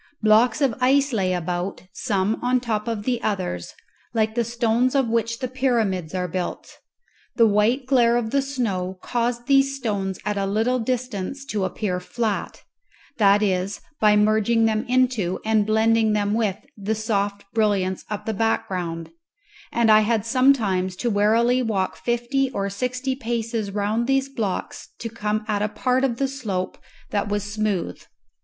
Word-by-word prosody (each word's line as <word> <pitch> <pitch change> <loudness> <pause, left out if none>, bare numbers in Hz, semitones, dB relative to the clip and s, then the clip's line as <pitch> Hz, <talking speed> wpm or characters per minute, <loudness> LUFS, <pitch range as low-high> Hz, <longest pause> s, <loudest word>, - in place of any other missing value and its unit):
Blocks 225 +6 +4
of 270 -4 +3
ice 275 +1 +3
lay 190 -4 +1
about, 180 +2 -3
some 205 -2 -1
on 250 +1 +2
top 225 -3 -2
of 225 -3 -2
the 245 0 -1
others, 185 - -3 0.4
like 220 -1 +1
the 235 +1 +1
stones 235 +2 +1
of 270 -3 +3
which 230 0 0
the 255 - -3
pyramids 225 -10 0
are 180 -1 -1
built; 180 +1 -5 0.6
the 230 - +5
white 220 +5 +2
glare 240 -3 +4
of 225 -2 -2
the 275 - +2
snow 205 -9 -2
caused 240 0 -1
these 275 0 +3
stones 200 -7 -2
at 210 -1 -1
a 195 - 0
little 225 +5 +1
distance 250 +1 -3
to 210 -8 -1
appear 185 -2 -2
flat 215 +3 -3 0.5
that 205 -1 +4
is, 190 0 0 0.2
by 210 -1 +5
merging 215 +2 +3
them 220 -1 +1
into 245 -8 +1
and 215 -1 +2
blending 220 0 +3
them 205 -1 +1
with 215 -4 0 0.2
the 210 +1 -2
soft 205 -2 -1
brilliance 200 -4 +1
of 210 -1 -4
the 220 - -1
background; 180 -6 -2 0.6
and 235 -2 +3
I 215 - +8
had 215 0 +1
sometimes 225 -8 +2
to 235 +5 -1
warily 230 +5 +3
walk 205 -6 -1
fifty 240 +3 0
or 200 -5 -3
sixty 255 +5 -2
paces 230 -4 -2
round 210 +4 -1
these 270 0 +1
blocks 215 -8 -4
to 230 - -5
come 215 -1 -2
at 210 -2 0
a 210 - 0
part 250 +4 0
of 245 -4 0
the 275 - +1
slope 210 -9 -4 0.3
that 205 -1 -1
was 205 -1 -1
smooth. 205 - -2
220 Hz, 160 wpm, -23 LUFS, 200-245 Hz, 0.6 s, I